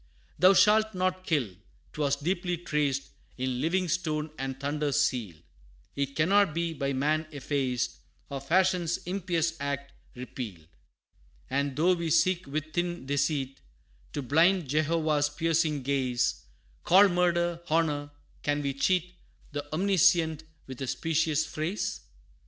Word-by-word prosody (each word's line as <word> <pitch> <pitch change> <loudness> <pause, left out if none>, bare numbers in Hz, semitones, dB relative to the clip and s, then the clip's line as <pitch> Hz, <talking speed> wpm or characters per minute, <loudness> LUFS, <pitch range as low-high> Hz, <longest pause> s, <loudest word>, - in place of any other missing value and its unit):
Thou 185 +4 +7
shalt 215 +1 +4
not 185 0 -1
kill!' 125 - 0 0.4
'Twas 145 -2 +1
deeply 175 +4 -2
traced 150 -5 -1 0.3
In 130 -1 -2
living 180 +3 +1
stone, 155 -3 -1
and 135 0 -4
thunder 145 +1 -1
sealed; 115 - -1 0.5
It 140 0 -2
cannot 185 +1 +3
be 170 -1 -1
by 140 -2 -2
man 155 +4 0
effaced, 135 -4 -2 0.3
Or 140 -1 -5
fashion's 175 +2 +2
impious 170 -3 -1
act 140 0 -4 0.2
repealed. 120 -9 -7 0.9
And 140 0 0
though 170 +5 +3
we 170 -2 -2
seek 170 +2 +2
with 155 +2 -4
thin 175 -4 -2
deceit, 140 -1 -1 0.5
To 145 - -3
blind 165 +5 +3
Jehovah's 155 0 +1
piercing 155 -2 0
gaze, 130 -3 0 0.4
Call 195 +3 +7
murder, 175 -1 +1
honor, 150 -3 +1 0.3
can 145 0 -1
we 140 -1 -1
cheat 180 +5 0 0.4
The 145 0 -6
Omniscient 170 -3 +3 0.2
with 130 0 -9
a 135 - -3
specious 160 +1 0
phrase? 160 +6 -3
155 Hz, 130 wpm, -28 LUFS, 140-175 Hz, 0.9 s, Thou